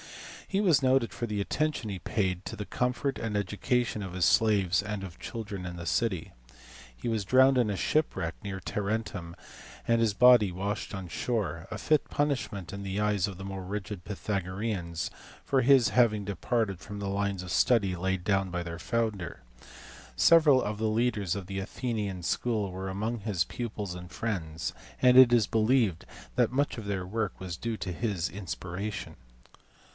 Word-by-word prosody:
He 195 - 0
was 170 -9 +4
noted 130 -2 +3
for 120 - -3
the 105 -2 -2
attention 150 +2 -1
he 95 -2 -4
paid 95 -3 -1
to - - -6
the 105 - -4
comfort 125 +4 -1
and 110 -2 -2
education 105 +3 0
of 95 -2 -6
his 90 -1 +2
slaves 100 -5 +3
and 105 -1 -4
of 90 -3 -9
children 100 -5 -6
in 90 -1 -6
the 85 - -6
city. 95 -3 -1 0.6
He - - -7
was 110 -3 0
drowned 130 +5 +5
in 120 -4 +3
a 100 - -1
shipwreck 90 - 0
near 95 -2 -4
Tarentum, 100 -1 -3 0.5
and 115 0 +3
his 110 -3 +2
body 120 -5 +7
washed 100 +5 -3
on 95 -2 -5
shore: 100 -4 -2
a - - -3
fit 155 -2 +1
punishment, 130 - -1
in 100 0 -5
the 95 +1 -3
eyes 105 -3 +2
of 95 -3 -7
the 95 - -7
more 95 -1 -5
rigid 100 0 -5
Pythagoreans, 95 -3 -3 0.4
for 135 -1 +2
his 130 -2 +5
having 110 -5 +3
departed 100 -1 -1
from 105 +3 -8
the 100 - -3
lines 100 -1 -1
of 90 - -7
study 100 -7 +3
laid 95 +1 -1
down 95 -2 +2
by 90 -1 -3
their 85 0 -6
founder. 105 - -2 0.7
Several 155 -6 +6
of 105 0 -3
the 110 0 +1
leaders 110 -5 +1
of 100 -2 -5
the 95 +1 -4
Athenian 105 -3 -3
school 105 -1 0
were 95 +1 -5
among 110 +5 -2
his 100 -4 0
pupils 110 -6 -4
and 90 -1 -9
friends, 85 -7 -3 0.3
and 125 0 +6
it 130 -1 +9
is 115 -4 +4
believed 110 -6 +2 0.3
that - - +3
much 140 +1 0
of 110 - -6
their 95 -2 -2
work 105 +1 -3
was 90 -2 -5
due 115 +4 -3
to 90 -3 -4
his 100 -4 -1
inspiration. 95 +1 -5
105 Hz, 180 wpm, -29 LUFS, 95-115 Hz, 0.7 s, it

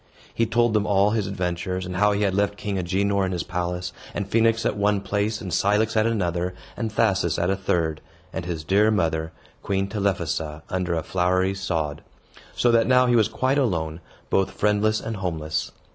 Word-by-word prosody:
He 115 - +1
told 120 0 +2
them 105 -1 +1
all 100 0 +3
his 105 -3 0
adventures, 90 -1 -2
and 90 0 -5
how 105 +1 +4
he 105 +1 0
had 100 -2 +1
left 100 +1 0
King 100 -3 -3
Agenor 100 +2 +1
in 95 - -1
his 90 -1 -2
palace, 90 0 -3 0.2
and 100 - -2
Phoenix 115 +1 +2
at - - +1
one 105 0 +1
place, 105 +2 -1
and 95 -3 -5
Cilix 105 +5 +2
at 110 +1 +3
another, 90 -5 -1 0.2
and 115 -2 -3
Thasus 100 -7 +1
at 85 +2 +1
a - - +2
third, 85 -5 -1 0.3
and 95 - -3
his 85 -3 -4
dear 100 +6 +3
mother, 80 -6 0 0.3
Queen 95 0 -1
Telephassa, 85 -7 -2
under 90 -2 -1
a 80 - -2
flowery 95 +2 +1
sod; 80 -6 -2 0.5
so 120 - +3
that 115 -1 +4
now 125 0 +5
he 120 -1 +3
was 110 -3 +4
quite 130 +5 0
alone, 80 - -1 0.3
both 95 - +2
friendless 105 +1 +1
and 115 -1 -4
homeless. 80 -5 -2
95 Hz, 190 wpm, -24 LUFS, 90-105 Hz, 0.5 s, now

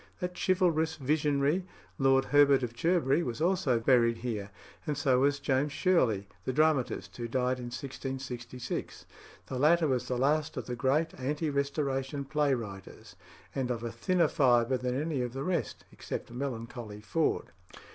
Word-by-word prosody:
That 180 0 -3
chivalrous 165 -4 +2
visionary, 145 +3 +1 0.4
Lord 135 0 +4
Herbert 140 -2 +5
of 120 -1 -3
Cherbury, 165 0 +2
was 120 -6 -4
also 165 -8 +2
buried 115 -1 +3
here, 110 -4 -4 0.4
and 150 -2 -1
so 135 -3 +3
was 145 +2 +3
James 140 +1 0
Shirley, 120 - +2 0.2
the - - -1
dramatist, 150 -2 +1
who 120 -1 -3
died 125 +1 0
in 125 - -6
1666. 130 -1 -6 0.4
The 130 - -4
latter 160 +3 +4
was 130 -3 0
the 125 - -1
last 145 +4 +1
of - - -3
the 125 - -4
great 140 +6 +1
ante 150 +4 -1
Restoration 140 -1 -1
play 145 -1 +1
writers, 100 -5 -9 0.4
and 130 -2 -2
of 120 -2 -2
a 115 - -3
thinner 170 +10 +2
fibre 125 -2 +3
than 125 +1 -2
any 150 -3 -1
of 120 -1 -3
the 135 +1 -4
rest, 175 -1 -2
except - - -6
melancholy 120 -4 -5
Ford. 160 +9 -1
135 Hz, 155 wpm, -30 LUFS, 125-150 Hz, 0.4 s, Herbert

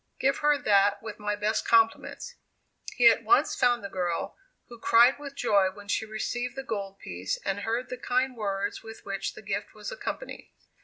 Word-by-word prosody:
give 275 +1 +2
her 295 0 +3
that 205 -4 +3
with 215 -2 -7
my 210 0 -1
best 210 +1 0
compliments." 230 - +1 0.6
He 245 -2 +6
at 230 - +6
once 395 - +3
found 245 -3 +2
the - - -3
girl, 180 -3 -3 0.3
who 235 -1 -12
cried 240 +4 +5
with 280 -1 -8
joy 200 -7 +3
when 205 +2 -13
she 220 +2 -1
received 240 +3 -3
the 270 - -5
gold 200 -5 -5
piece, 90 - -4
and 195 0 -1
heard 230 +4 -2
the 250 - -5
kind 255 +1 0
words 200 -3 -3
with 225 0 -11
which 195 0 -4
the - - -11
gift - - -4
was - - -7
accompanied. - - -6
225 Hz, 190 wpm, -27 LUFS, 200-250 Hz, 0.6 s, He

